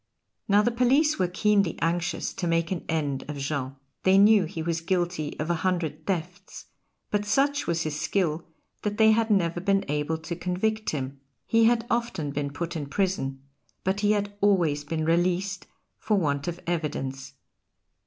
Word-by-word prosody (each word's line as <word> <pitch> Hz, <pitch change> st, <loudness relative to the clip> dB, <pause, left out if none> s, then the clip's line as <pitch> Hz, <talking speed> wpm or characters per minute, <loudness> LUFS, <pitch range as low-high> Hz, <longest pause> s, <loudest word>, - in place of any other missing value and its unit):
Now 205 Hz, +1 st, +5 dB
the 240 Hz, -, +2 dB
police 265 Hz, +5 st, +3 dB
were 185 Hz, -, +3 dB
keenly 200 Hz, -1 st, +2 dB
anxious 165 Hz, 0 st, -1 dB
to 180 Hz, -, -3 dB
make 165 Hz, +1 st, +1 dB
an 185 Hz, -, -2 dB
end 145 Hz, -4 st, -1 dB
of 150 Hz, -, -4 dB
Jean. 140 Hz, -1 st, -3 dB, 0.3 s
They 190 Hz, +1 st, +4 dB
knew 205 Hz, -1 st, +6 dB
he 160 Hz, -1 st, -5 dB
was 165 Hz, 0 st, -1 dB
guilty 175 Hz, -3 st, -1 dB
of 155 Hz, +3 st, -1 dB
a 165 Hz, -1 st, -1 dB
hundred 165 Hz, -4 st, -1 dB
thefts, 180 Hz, -2 st, -4 dB, 0.5 s
but 205 Hz, 0 st, +1 dB
such 275 Hz, +7 st, +1 dB
was 170 Hz, -1 st, 0 dB
his 155 Hz, -1 st, -3 dB
skill 165 Hz, -5 st, 0 dB, 0.4 s
that 210 Hz, 0 st, -2 dB
they 220 Hz, -1 st, +6 dB
had 225 Hz, +1 st, +2 dB
never 175 Hz, -5 st, +2 dB
been 195 Hz, +1 st, +1 dB
able 150 Hz, +2 st, -1 dB
to 160 Hz, +2 st, -5 dB
convict 205 Hz, +6 st, -1 dB
him; 135 Hz, -2 st, -4 dB, 0.3 s
he 230 Hz, 0 st, +4 dB
had 230 Hz, 0 st, +3 dB
often 225 Hz, -12 st, -1 dB
been 140 Hz, 0 st, -2 dB
put 170 Hz, +4 st, -4 dB
in 150 Hz, -3 st, -3 dB
prison, 140 Hz, -6 st, -1 dB, 0.4 s
but 190 Hz, +2 st, 0 dB
he 205 Hz, 0 st, +3 dB
had 205 Hz, -1 st, -1 dB
always 170 Hz, -8 st, +3 dB
been 155 Hz, +1 st, -2 dB
released 180 Hz, +1 st, 0 dB, 0.3 s
for 215 Hz, -, +1 dB
want 145 Hz, -5 st, 0 dB
of 175 Hz, 0 st, -3 dB
evidence. 140 Hz, -5 st, -3 dB
175 Hz, 175 wpm, -26 LUFS, 155-205 Hz, 0.5 s, knew